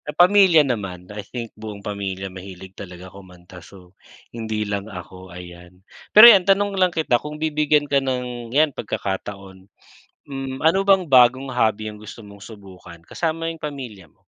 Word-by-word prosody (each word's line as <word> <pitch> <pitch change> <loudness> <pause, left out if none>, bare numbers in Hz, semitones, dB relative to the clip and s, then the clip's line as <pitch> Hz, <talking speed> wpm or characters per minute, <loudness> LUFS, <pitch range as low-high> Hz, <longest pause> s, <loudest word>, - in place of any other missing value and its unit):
Sa 150 - -7
pamilya 180 -4 +5
naman, 95 -8 -4
I 105 - -6
think, 115 +3 -8
buong 105 -2 -10
pamilya 95 -2 -5
mahilig 95 0 -11
talaga 90 -2 -11
kumanta. 90 -2 -15
So, 90 0 -17 0.4
hindi 110 -2 -4
lang 100 0 -4
ako, 95 -1 -11
ayan. 90 +1 -13 0.2
Pero 215 +2 +9
'yan 215 -5 +9
tanong 200 +1 +2
lang 185 -1 +2
kita, 155 -8 0
kung 150 0 -8
bibigyan 150 -1 +1
ka 140 -1 +1
ng 125 -3 -4
'yan 145 +3 +2
pagkakataon. 95 -2 -6 0.6
Hmm, 135 -1 -6
ano 165 +5 +3
bang 195 -2 +3
bagong 130 -1 +4
hobby 110 -3 0
ang 105 - -9
gusto 110 +1 -11
mong 100 -1 -14
subukan 95 -5 -13
kasama 165 0 -3
'yong 165 -1 -6
pamilya 125 - -8
mo? - - -38
110 Hz, 165 wpm, -21 LUFS, 95-150 Hz, 0.6 s, Pero